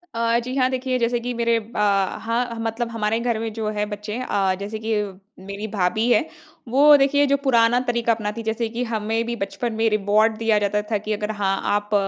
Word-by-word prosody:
अ, 230 0 +2
जी, 255 +2 -5
हाँ। 255 -1 +2
देखिए 255 0 -1
जैसे 235 0 +1
कि 245 +1 -4
मेरे 235 -1 +1
ब 225 +2 -15 0.5
हाँ, 235 +1 -1
मतलब 225 +1 -2
हमारे 225 0 0
घर 235 -1 -1
में 225 0 -3
जो 220 -1 -3
है 210 - +1
बच्चे 210 +1 -5
अ, 195 -6 0
जैसे 210 +2 -5
कि 225 - 0 0.5
मेरी 200 +2 -5
भाभी 215 +2 0
है, 235 +7 +3 0.4
वो 290 +4 +7
देखिए 285 +1 +3
जो 280 0 +3
पुराना 240 -2 +4
तरीका 235 -1 +1
अपनाती 220 0 -4
जैसे 225 +1 -1
कि 235 +2 -3
हमें 225 -1 -1
भी 235 0 -3
बचपन 225 +3 -3
में 225 0 +2
रिवार्ड 215 +1 +2
दिया 225 -1 +2
जाता 205 0 0
था 215 - +2
कि 215 - -1
अगर 210 +1 -3
हाँ, 200 -2 0 0.2
आप 205 +1 -3
225 Hz, 210 wpm, -22 LUFS, 210-235 Hz, 0.5 s, वो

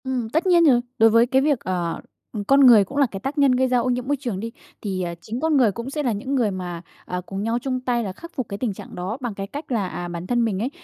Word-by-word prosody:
Ừm, 255 -4 -2
tất 320 +9 0
nhiên 345 -2 +5
rồi, 250 -5 +5 0.2
đối 225 0 +6
với 230 +2 +5
cái 260 +2 +2
việc, 285 -3 +2
ờ 175 -4 -3 0.3
ừm, 210 -3 -3
con 275 +7 +4
người 225 -4 +8
cũng 275 - -8
là 285 - +5
cái 195 - -5
tác 270 +8 -4
nhân 280 -2 +5
gây 255 +1 +2
ra 250 -1 +2
ô 255 - 0
nhiễm 250 0 -1
môi 285 0 +1
trường 240 -8 -3
đi, 230 +3 -5 0.3
thì, 190 -3 -3
à, 170 -1 -4
chính 225 +6 -5
con 315 0 +2
người 240 -6 +4
cũng 235 +6 -6
sẽ 295 +2 -3
là 250 - +1
những 260 +7 -3
người 235 -6 +2
mà, 180 -2 -5 0.2
à, 180 0 -4
cùng 195 +3 -5
nhau 230 +2 0
chung 255 0 -2
tay 245 -2 -1
là 195 -3 -4
khắc 335 - -12
phục 255 -5 -3
cái 200 - -4
tình 225 -2 -2
trạng - - -11
đó, 185 +6 -4
bằng 240 -4 -3
cái 195 0 -5
cách 290 +5 -8
là, 210 -6 0
à, 175 -1 -5
bản 175 +1 -6
thân 240 +1 +2
mình 200 -4 -1
ấy, 235 +5 -1
235 Hz, 310 wpm, -23 LUFS, 195-260 Hz, 0.3 s, người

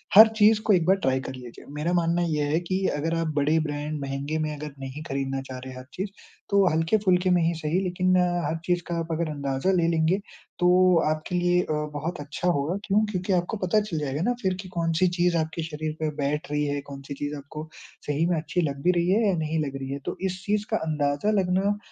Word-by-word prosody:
हर 220 +2 +12
चीज़ 215 0 +6
को 210 - +5
एक 170 -3 +3
बार 190 - +5
ट्राई 130 -8 +1
कर 130 - -6
लीजिए। 125 -2 -11
मेरा 150 +4 -1
मानना 170 0 +2
ये 150 -2 0
है 160 - +3
कि 185 +2 -2
अगर 160 +3 -1
आप 165 0 0
बड़े 150 +2 +3
ब्रांड 150 0 -3
महँगे 140 +3 -3
में 150 - -3
अगर 150 -1 -7
नहीं 135 +2 -6
खरीदना 135 -1 -2
चाह 130 -1 -8
रहे 130 +1 -8
हैं - - -10
हर 130 - -10
चीज़, 190 +3 -3 0.4
तो 200 -1 +4
हल्के-फुल्के 180 +2 +2
में 180 -1 +4
ही 165 +1 +2
सही 155 +3 0
लेकिन 185 0 +1
अ, 175 -1 +1
हर 165 - -1
चीज़ 175 0 +1
का 170 - -2
आप 165 - -4
अगर 165 0 -1
अंदाज़ा 140 +4 -1
ले 175 -3 +2
लेंगे 165 +2 +2 0.4
तो 180 0 +4 0.4
आपके 155 +3 -2
लिए 175 0 +3
अ, - - -4 0.3
बहुत 155 +4 -4
अच्छा 150 +4 -4
होगा, 170 +2 +1
क्यों? 210 +1 +3
क्योंकि 185 +1 -1
आपको 180 +5 0
पता 200 +4 +3
चल 190 -7 -3
जाएगा 145 0 -2
ना 245 +7 +2
फिर 190 -2 +1
की 190 - -10
कौन-सी 170 0 +1
चीज़ 175 -1 +3
आपके 160 +1 -2
शरीर 155 0 -4
पे 155 - 0
बैठ 145 +1 -2
रही 150 0 +1
है, 145 0 -1
कौन-सी 140 0 -8
चीज़ 145 +1 -4
आपको 150 +3 -8 0.4
सही 150 +2 +1
में 175 - +2
अच्छी 165 +3 -1
लग 140 0 -6
भी 180 - +5
रही 170 - +1
है 215 +2 +3
या 190 - +2
नहीं 160 0 -1
लग 140 -1 -5
रही 135 -1 -6
है। 140 - -3
तो - - -3
इस 185 0 -6
चीज़ 210 0 0
का - - +3
अंदाज़ा 145 +5 +1
लगना 190 +2 +1
165 Hz, 240 wpm, -26 LUFS, 145-180 Hz, 0.4 s, हर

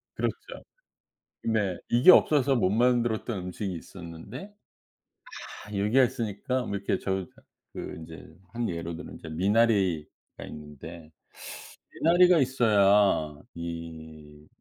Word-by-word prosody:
그렇죠. - - -4 0.8
네. 105 -5 0
이게 125 +10 +7
없어서 140 -6 +5
못 95 -5 +2
만들었던 120 -1 +1
음식이 90 +1 -4
있었는데 95 - -10 1.2
아 105 - -6
여기에 110 +7 +4
있으니까 125 +1 -2
뭐 100 - -3
이렇게 100 -1 -1
저 95 -2 -2 0.5
그 - - -6
이제 80 0 -11 0.3
한 120 -1 -1
예로 85 -1 -4
들면 85 - -9
이제 80 - -10
미나리가 95 -2 +2 0.4
있는데 75 +2 -10 0.8
미나리가 175 +1 +5
있어야 100 - +3
이 80 -3 -8
100 Hz, 240 characters per minute, -27 LUFS, 85-120 Hz, 1.2 s, 이게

